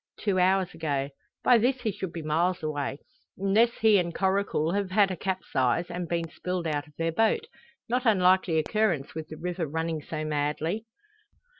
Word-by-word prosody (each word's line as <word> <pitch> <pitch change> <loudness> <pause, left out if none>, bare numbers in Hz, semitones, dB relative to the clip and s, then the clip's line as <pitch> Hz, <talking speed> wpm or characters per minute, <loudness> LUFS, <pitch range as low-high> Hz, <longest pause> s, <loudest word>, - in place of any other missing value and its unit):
"Two 195 -3 +1
hours 185 0 +2
ago. 145 -4 -2 0.3
By 245 -2 +6
this 250 +3 +1
he 220 -3 0
should 190 -3 -5
be 165 -1 -6
miles 170 +4 0
away; 145 -2 -3 0.4
unless 195 +5 +3
he 215 -3 +6
and 170 -1 -2
Coracle 190 -5 +1
have 200 0 -1
had 195 0 +3
a - - -2
capsize, 175 -4 -1
and 175 -1 -4
been 170 -1 -1
spilled 180 -1 -3
out 150 -1 -2
of 150 - -21
their 165 0 0
boat. 225 - +2 0.4
No 245 +2 +1
unlikely 185 -6 +4
occurrence 165 -3 0
with 160 -1 -6
the 155 - -9
river 170 0 -3
running 160 +1 -2
so 155 +1 -5
madly." 155 +8 -1
175 Hz, 175 wpm, -27 LUFS, 155-195 Hz, 0.4 s, By